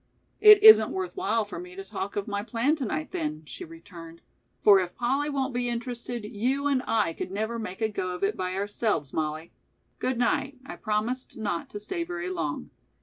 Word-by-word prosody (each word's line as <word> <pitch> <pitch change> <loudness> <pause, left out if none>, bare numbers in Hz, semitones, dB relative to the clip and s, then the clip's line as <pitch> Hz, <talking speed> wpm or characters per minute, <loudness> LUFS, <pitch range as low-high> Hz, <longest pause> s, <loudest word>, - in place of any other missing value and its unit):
"It 425 -1 +9
isn't 435 0 +10
worth 375 -1 -4
while 230 - 0
for 205 - -7
me 180 +1 -10
to 195 - -6
talk 195 0 -5
of 205 - -2
my 205 -1 -2
plan 235 +7 +1
to 270 - -3
night, 155 -7 -3
then," 155 0 -3
she 135 - -8
returned, 165 0 -12 0.4
"for 200 -2 +8
if 180 -1 -3
Polly 275 +5 0
won't 270 -2 -1
be 245 0 -1
interested, 240 -1 -4
you 250 +7 -1
and, 275 -3 +2
I 215 -7 +1
could - - -5
never 220 +4 -3
make 215 -1 -6
a 220 - +3
go 185 -3 -3
of 180 - -7
it 200 +2 +1
by 185 0 -3
ourselves, 200 - -1
Mollie. 155 +1 -3 0.5
Good 255 -1 -1
night; 265 +3 0
I - - -7
promised 220 +4 -2
not 205 -6 -3
to 205 - -7
stay 340 - -3
very 360 +2 -4
long." 370 - -4
220 Hz, 205 wpm, -27 LUFS, 185-260 Hz, 0.5 s, isn't